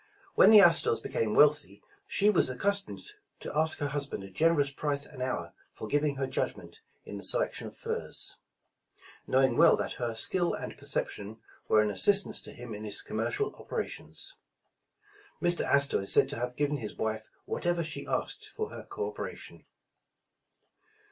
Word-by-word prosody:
When -, -, +6 dB
the 215 Hz, -2 st, +9 dB
Astors 165 Hz, -9 st, +4 dB
became 110 Hz, -1 st, -2 dB
wealthy, 145 Hz, -10 st, +3 dB, 0.2 s
she 205 Hz, +1 st, +3 dB
was 175 Hz, -, +2 dB
ac 130 Hz, -, -5 dB
customed 200 Hz, +3 st, -1 dB, 0.4 s
to -, -, -7 dB
ask 160 Hz, +1 st, +1 dB
her 145 Hz, -1 st, -2 dB
husband 140 Hz, -7 st, -4 dB
a 95 Hz, -, -11 dB
generous 145 Hz, -, +2 dB
price 145 Hz, 0 st, -2 dB
an 130 Hz, -4 st, -9 dB
hour 130 Hz, 0 st, -3 dB, 0.2 s
for 110 Hz, -, -8 dB
giving 145 Hz, +3 st, 0 dB
her 135 Hz, 0 st, -2 dB
judgment 135 Hz, -, -4 dB, 0.3 s
in -, -, -7 dB
the -, -, -8 dB
selection -, -, +3 dB
of -, -, -12 dB
furs, 455 Hz, 0 st, -5 dB, 0.9 s
know 130 Hz, +1 st, +3 dB
ing 130 Hz, -3 st, +2 dB
well 165 Hz, +1 st, +6 dB
that -, -, -4 dB
her 120 Hz, -2 st, -2 dB
skill 175 Hz, +9 st, +1 dB
and -, -, -6 dB
perception 105 Hz, +3 st, -4 dB, 0.3 s
were 110 Hz, -, +4 dB
an 105 Hz, -, -1 dB
assistance 200 Hz, -, +5 dB
to -, -, -7 dB
him 120 Hz, -2 st, -9 dB
in 105 Hz, +1 st, -7 dB
his 105 Hz, -1 st, -4 dB
commercial 115 Hz, -, -2 dB
operations. -, -, -6 dB, 1.1 s
Mr. 175 Hz, -1 st, +3 dB
Astor 140 Hz, -4 st, +2 dB
is 100 Hz, -, -2 dB
said -, -, +5 dB
to -, -, -5 dB
have 125 Hz, 0 st, -3 dB
given 145 Hz, +1 st, 0 dB
his 110 Hz, -5 st, -6 dB
wife 110 Hz, 0 st, -3 dB, 0.2 s
whatever 175 Hz, -1 st, -1 dB
she 165 Hz, +2 st, -5 dB
asked -, -, -3 dB
for 435 Hz, -1 st, -5 dB
her -, -, -8 dB
co 435 Hz, +2 st, -5 dB
operation. 435 Hz, -, -8 dB
145 Hz, 170 wpm, -29 LUFS, 115-175 Hz, 1.1 s, the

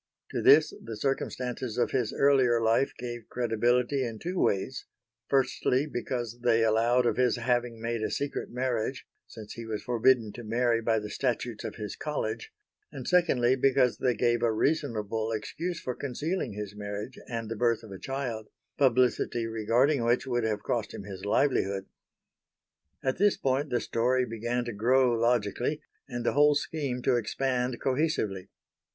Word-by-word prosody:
To -, -, -2 dB
this 155 Hz, +2 st, +6 dB
the 115 Hz, -1 st, -6 dB
circumstances 125 Hz, -1 st, -2 dB
of 125 Hz, -, +1 dB
his 125 Hz, -5 st, 0 dB
earlier 130 Hz, -4 st, +4 dB
life 115 Hz, +4 st, +2 dB
gave 120 Hz, -2 st, -7 dB
credibility 120 Hz, +3 st, +1 dB
in 115 Hz, -3 st, -4 dB
two 180 Hz, +8 st, -3 dB
ways; 100 Hz, +7 st, 0 dB, 0.4 s
firstly 135 Hz, 0 st, +2 dB
because 120 Hz, -4 st, -4 dB
they 115 Hz, -1 st, +3 dB
allowed 115 Hz, +3 st, +3 dB
of 120 Hz, -, +1 dB
his 125 Hz, -2 st, +3 dB
having 120 Hz, -1 st, -1 dB
made 115 Hz, 0 st, -2 dB
a -, -, -1 dB
secret 145 Hz, 0 st, -3 dB
marriage, 125 Hz, 0 st, -2 dB, 0.2 s
since 110 Hz, -2 st, -10 dB
he 115 Hz, -, -7 dB
was 110 Hz, -1 st, -4 dB
forbidden 120 Hz, -2 st, +3 dB
to 120 Hz, -, -8 dB
marry 115 Hz, +1 st, +1 dB
by 115 Hz, 0 st, +2 dB
the 105 Hz, -1 st, -4 dB
statutes 120 Hz, -2 st, -2 dB
of -, -, -5 dB
his 105 Hz, -2 st, -6 dB
college, 115 Hz, -7 st, -3 dB, 0.4 s
and 130 Hz, -3 st, -7 dB
secondly 135 Hz, -9 st, +3 dB
because 130 Hz, -1 st, +2 dB
they 125 Hz, -2 st, +1 dB
gave 120 Hz, +1 st, +1 dB
a 120 Hz, -1 st, +3 dB
reasonable 110 Hz, -5 st, -1 dB
excuse 165 Hz, +11 st, -3 dB
for 125 Hz, -, -3 dB
concealing 145 Hz, -, -3 dB
his 105 Hz, 0 st, -6 dB
marriage 105 Hz, +4 st, -6 dB
and 115 Hz, -2 st, -4 dB
the 115 Hz, -, -4 dB
birth 115 Hz, 0 st, +1 dB
of 110 Hz, -, -11 dB
a 95 Hz, -, -8 dB
child, 125 Hz, -5 st, -4 dB, 0.3 s
publicity 125 Hz, -3 st, +2 dB
regarding 115 Hz, +5 st, +2 dB
which 120 Hz, +3 st, +2 dB
would 120 Hz, -3 st, 0 dB
have 105 Hz, -2 st, -1 dB
cost 115 Hz, -4 st, -2 dB
him -, -, -7 dB
his 95 Hz, -1 st, -8 dB
livelihood. 100 Hz, -5 st, +1 dB, 1.2 s
At 130 Hz, +5 st, -1 dB
this 205 Hz, 0 st, +4 dB
point 135 Hz, +2 st, 0 dB
the 120 Hz, -, +1 dB
story 125 Hz, +2 st, +1 dB
began 120 Hz, +2 st, -2 dB
to 120 Hz, -, -4 dB
grow 125 Hz, +4 st, +3 dB
logically, 120 Hz, +4 st, +1 dB, 0.3 s
and 120 Hz, -2 st, -4 dB
the -, -, +2 dB
whole 145 Hz, +1 st, +5 dB
scheme 140 Hz, -5 st, -2 dB
to 125 Hz, -, +3 dB
expand 125 Hz, +1 st, -1 dB
cohesively. 130 Hz, -, -1 dB
120 Hz, 165 wpm, -28 LUFS, 115-130 Hz, 1.2 s, this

